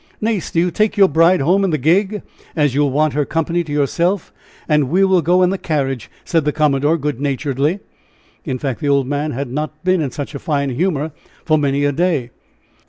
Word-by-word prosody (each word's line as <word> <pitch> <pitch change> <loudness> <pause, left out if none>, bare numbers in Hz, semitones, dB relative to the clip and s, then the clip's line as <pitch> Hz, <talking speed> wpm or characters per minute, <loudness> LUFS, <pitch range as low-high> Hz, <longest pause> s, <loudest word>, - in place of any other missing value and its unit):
"Nace, 215 -5 -1
do 165 - 0
you 175 +1 +1
take 215 +5 0
your 195 -1 +6
bride 165 +2 +3
home 185 +8 +2
in 195 - +1
the 155 - 0
gig, 190 +9 +1 0.3
as 145 -5 +2
you 145 - +1
will 145 - +2
want 150 +2 +1
her 145 +1 +1
company 165 +3 -1
to 155 - -9
yourself, 170 +6 0 0.3
and 150 -4 +2
we 185 +6 +3
will 190 -2 +3
go 180 +4 +3
in 180 - +3
the 195 - -3
carriage," 135 -8 -2 0.2
said 165 -2 +1
the 150 - +1
commodore, 150 +1 +2
good 145 -4 -3
naturedly. 145 +5 -1 0.6
In 130 -5 -3
fact, 130 -3 -3
the 145 - -1
old 140 -1 +3
man 145 +3 -2
had 135 -2 -4
not 150 +2 -4
been 185 -1 +2
in 145 - -1
such 145 +4 -6
a 140 - -5
fine 140 -2 -1
humor 155 +1 -1 0.3
for 155 - +3
many 140 0 +1
a 145 - +2
day. 145 -6 0
150 Hz, 220 wpm, -18 LUFS, 140-175 Hz, 0.6 s, your